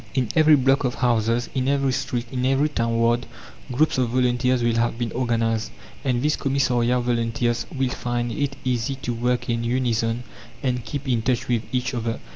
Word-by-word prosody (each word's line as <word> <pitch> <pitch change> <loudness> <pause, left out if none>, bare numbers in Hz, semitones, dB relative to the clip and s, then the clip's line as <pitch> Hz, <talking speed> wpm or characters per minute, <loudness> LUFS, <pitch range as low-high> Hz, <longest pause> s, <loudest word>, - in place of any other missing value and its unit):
In 125 -5 +1
every 155 -1 +7
block 135 +1 +3
of 125 -2 -1
houses, 115 0 +1
in 130 -1 0
every 140 -1 +2
street, 130 -2 -2
in 125 -1 -2
every 135 +3 +2
town 115 -5 -1
ward, 115 +1 +2 0.4
groups 140 +2 +2
of 125 -2 +1
volunteers 125 0 +1
will 115 -1 +2
have 115 0 +1
been 120 -2 -2
organized, 115 -3 0 0.3
and 125 -2 0
these 150 +1 +2
commissariat 125 -3 +1
volunteers 120 0 0
will 135 -5 -1
find 120 -1 -2
it 140 +4 -2
easy 125 +1 0
to 125 -2 -4
work 125 +1 -1
in 115 0 -1
unison 115 -1 0 0.4
and 125 -3 -1
keep 140 +5 -5
in 120 -3 +1
touch 120 0 0
with 120 -3 +1
each 125 0 -1
other. 115 -2 -2
125 Hz, 185 wpm, -23 LUFS, 115-130 Hz, 0.4 s, every